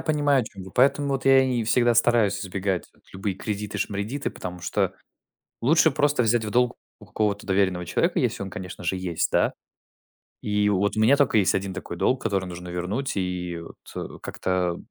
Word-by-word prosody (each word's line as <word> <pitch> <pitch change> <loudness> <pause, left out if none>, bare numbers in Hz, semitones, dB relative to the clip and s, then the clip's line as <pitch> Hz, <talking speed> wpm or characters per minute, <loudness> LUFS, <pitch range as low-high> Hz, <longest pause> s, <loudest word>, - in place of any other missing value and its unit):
понимаю, 145 -3 +2
о - - -3
чём 100 -3 -10
вы, 95 - -10
поэтому 140 +3 +3
вот 135 -1 -1
я 135 0 +7
и 125 -3 0
всегда 120 +2 +3
стараюсь 115 -4 +3
избегать 95 -1 -2
вот - - -30
любые 95 0 -3
кредиты-шмредиты, 105 +4 -3
потому 90 0 -7
что 90 - -1 0.7
лучше 155 +6 +4
просто 145 -2 +2
взять 115 0 +2
в 105 - -4
долг 125 +2 +2 0.2
у 105 - -14
какого-то 105 0 -1
доверенного 95 -2 +1
человека, - - +1
если - - -1
он, 95 - -5
конечно 90 -1 -8
же, 85 - 0
есть, 90 -3 -1
да. - - +3 0.9
И 105 0 +1
вот 100 +1 +1
у - - +1
меня 120 +6 +5
только 140 -6 +3
есть 100 -1 +3
1 95 -1 -3
такой - - -6
долг, 130 0 +1
который 100 -4 0
нужно 90 0 -8
вернуть, 95 +11 -3
и 90 -2 -2 0.4
вот - - -7
как-то 90 -2 -1
105 Hz, 185 wpm, -25 LUFS, 95-125 Hz, 0.9 s, я